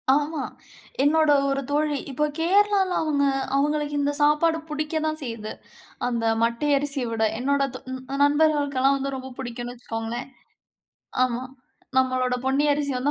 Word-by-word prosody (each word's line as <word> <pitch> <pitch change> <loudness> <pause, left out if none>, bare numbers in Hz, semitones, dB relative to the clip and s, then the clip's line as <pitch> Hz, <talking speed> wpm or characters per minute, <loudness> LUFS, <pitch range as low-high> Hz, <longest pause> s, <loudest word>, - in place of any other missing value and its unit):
ஆமா, 295 0 -1 0.6
என்னோட 310 +1 +4 0.2
ஒரு 275 0 0
தோழி 295 -1 +1
இப்போ 300 +4 +1
கேரளால 390 +2 +3
அவங்க 295 -3 +1 0.3
அவங்களுக்கு 295 +1 0
இந்த 285 +1 +1
சாப்பாடு 300 +2 +3
பிடிக்க 300 +1 -3
தான் 310 0 -1
செய்யுது, 230 -3 -5 0.6
அந்த 235 -2 -1 0.2
மட்டை 235 +6 0
அரிசிய 280 -2 -2
விட. 225 -1 0 0.2
என்னோட 280 +2 +1
தோ - - -5 0.4
நண்பர்களுக்கெல்லாம் 285 -2 +3
வந்து 275 0 -3
ரொம்ப 260 0 -8
பிடிக்கும்னு 240 -1 -5
வச்சுக்கோங்களேன். 230 +1 -5 1.0
ஆமா 245 0 -2 0.5
நம்மளோட 255 -1 +2
பொன்னி 270 +2 +2
அரிசி 285 -1 -1
வந்து 270 +4 0
280 Hz, 135 wpm, -24 LUFS, 255-300 Hz, 1.0 s, என்னோட